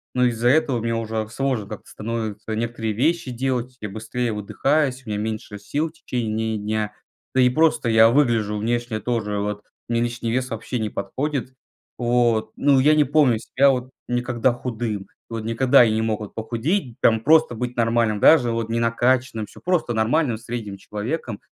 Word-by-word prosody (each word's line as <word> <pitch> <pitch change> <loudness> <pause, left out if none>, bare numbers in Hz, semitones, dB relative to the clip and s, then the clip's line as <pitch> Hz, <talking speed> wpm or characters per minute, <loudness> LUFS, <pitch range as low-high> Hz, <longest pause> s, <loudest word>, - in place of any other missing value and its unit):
Но 125 0 +3
из-за 120 -1 +1
этого 140 -2 +3
мне 115 +1 -1
уже 110 -1 -2
сложно 130 -2 -1
как-то 110 - -9
становится 110 -1 -4
некоторые 115 -1 -2
вещи 145 +4 0
делать. 125 0 -2
Я 110 - -4
быстрее 115 +3 -3
выдыхаюсь, 130 +6 0
у - - -9
меня 105 - -1
меньше 110 -1 -4
сил 145 +10 -2
в - - -22
течение 110 -7 -2
дня. 105 0 -2 0.4
Да 130 - +5
и 125 - +5
просто 155 -2 +2
я 110 0 +6
выгляжу 115 -6 +2
внешне 120 +1 -1
тоже, 105 -2 -2
вот, 105 0 -3 0.3
мне 115 0 +1
лишний 120 -1 -2
вес 125 +1 -1
вообще 115 +2 -4
не 110 -1 -1
подходит. 130 +7 -3 0.4
Вот. 120 -2 +1
Ну, 140 -1 +3
я 150 +3 +5
не 150 - +5
помню 140 -5 +3
себя 140 +4 +3
вот 130 -1 -3 0.2
никогда 120 0 0
худым, 115 -5 -4 0.2
вот 115 -1 -4
никогда 125 +4 +3
вот 115 - +3
не 110 +1 0
мог 110 -1 -1
я 105 - -5
похудеть, 120 - -2
там, 115 -1 +4
просто 155 0 +4
быть 125 +1 -4
нормальным, 115 -2 +1
даже 125 -1 +6
вот 115 -1 -2
не 115 +1 0
накачанным- 115 -1 +1
всё, - - -16
просто 175 -9 0
нормальным, 115 +3 +1
средним 110 -3 -6
человеком. 105 +3 -5
115 Hz, 180 wpm, -22 LUFS, 110-130 Hz, 0.4 s, я